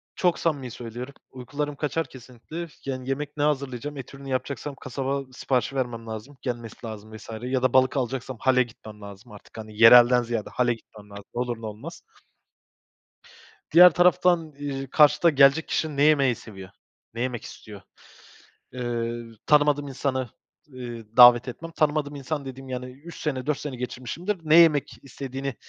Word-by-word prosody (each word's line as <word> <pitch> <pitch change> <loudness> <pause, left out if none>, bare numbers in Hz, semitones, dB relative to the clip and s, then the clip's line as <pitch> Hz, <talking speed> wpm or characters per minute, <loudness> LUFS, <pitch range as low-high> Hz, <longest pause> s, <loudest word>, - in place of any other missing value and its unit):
Çok 175 -2 +1
samimi 140 -7 -1
söylüyorum, 120 +4 -8 0.2
uykularım 145 +3 -5
kaçar 155 +3 -2
kesinlikle. 130 +7 -9 0.2
Yani, 130 -1 -5
yemek 145 +2 -4
ne 145 - 0
hazırlayacağım, 140 -1 -2
et 130 -1 -9
ürünü 135 0 -10
yapacaksam 135 +2 -3
kasaba 135 +1 -3
siparişi 130 +1 -1
vermem 120 -3 -3
lazım, 110 +6 -8
gelmesi 120 -3 -5
lazım 110 0 -9
vs. 110 - -14
Ya 125 +1 -1
da 130 - +2
balık 130 +1 +3
alacaksam 130 0 -3
hale 130 0 +3
gitmem 110 -2 -13
lazım 100 0 -12
artık, 105 +2 -15
hani, 110 0 -8
yerelden 120 +1 +8
ziyade 115 -2 -3
hale 125 -1 +1
gitmem 105 -2 -15
lazım, 100 0 -10
ne 120 - -1
olur 120 -2 -3
ne - - -6
olmaz. 110 +11 -8 1.7
Diğer 180 +3 +9
taraftan, 175 -2 +3
ııı, 135 -1 -4
karşıda 150 +3 +5
gelecek 145 +1 +4
kişi 155 -3 -2
ne 140 - +3
yemeyi 140 -5 +4
seviyor, 95 -4 -11 0.4
ne 115 - -5
yemek 125 -2 -3
istiyor? 105 -3 -11 0.9
Eee, 120 -1 -3 0.2
tanımadığım 145 -1 +3
insanı, 130 -2 -2 0.4
eee, 120 -4 -8
davet 120 0 +9
etmem, 165 +7 -7
tanımadığım 150 -2 0
insan 140 +1 -4
dediğim 135 0 -9
yani 125 0 -4
3 150 +7 -12
sene, 135 -4 -3
4 150 -1 0
sene 145 -3 -5
geçirmişimdir, 130 - -4
ne 155 0 +4
yemek 160 -4 +5
istediğini 135 0 -6
130 Hz, 160 wpm, -25 LUFS, 120-145 Hz, 1.7 s, Diğer